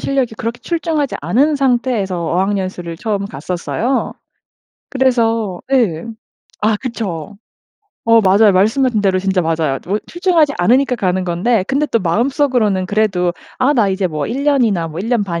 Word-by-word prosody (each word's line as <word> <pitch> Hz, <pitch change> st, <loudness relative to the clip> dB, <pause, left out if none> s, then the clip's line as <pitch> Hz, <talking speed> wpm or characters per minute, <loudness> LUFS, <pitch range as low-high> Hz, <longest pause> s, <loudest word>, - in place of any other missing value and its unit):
실력이 265 Hz, -5 st, -1 dB
그렇게 230 Hz, +2 st, -4 dB
출중하지 325 Hz, -4 st, -2 dB
않은 260 Hz, -, +2 dB
상태에서 240 Hz, -9 st, 0 dB
어학연수를 185 Hz, -2 st, -2 dB
처음 200 Hz, 0 st, -2 dB
갔었어요. 185 Hz, -, -2 dB, 0.8 s
그래서 230 Hz, -7 st, +1 dB
예 210 Hz, -9 st, +1 dB, 0.6 s
아 215 Hz, 0 st, +3 dB
그쵸. 205 Hz, -6 st, -5 dB, 0.7 s
어 230 Hz, 0 st, +5 dB
맞아요 200 Hz, +1 st, +5 dB
말씀하신 220 Hz, +4 st, +2 dB
대로 190 Hz, -2 st, +2 dB
진짜 190 Hz, -1 st, 0 dB
맞아요. 160 Hz, -4 st, 0 dB
뭐 205 Hz, +3 st, 0 dB
출중하지 345 Hz, -4 st, +2 dB
않으니까 250 Hz, +8 st, +3 dB
가는 185 Hz, -2 st, 0 dB
건데 185 Hz, +4 st, 0 dB
근데 285 Hz, +3 st, 0 dB
또 230 Hz, -, +1 dB
마음속으로는 225 Hz, -, +1 dB
그래도 195 Hz, -4 st, 0 dB, 0.3 s
'아 260 Hz, +3 st, +3 dB
나 230 Hz, -8 st, +2 dB
이제 190 Hz, 0 st, 0 dB
뭐 150 Hz, -2 st, -3 dB
1 270 Hz, +5 st, -3 dB
년이나 230 Hz, -, +2 dB
뭐 160 Hz, +2 st, -8 dB
1 220 Hz, -, -4 dB
년 235 Hz, -5 st, +1 dB
반 170 Hz, -3 st, -3 dB
215 Hz, 330 characters per minute, -17 LUFS, 185-255 Hz, 0.8 s, 어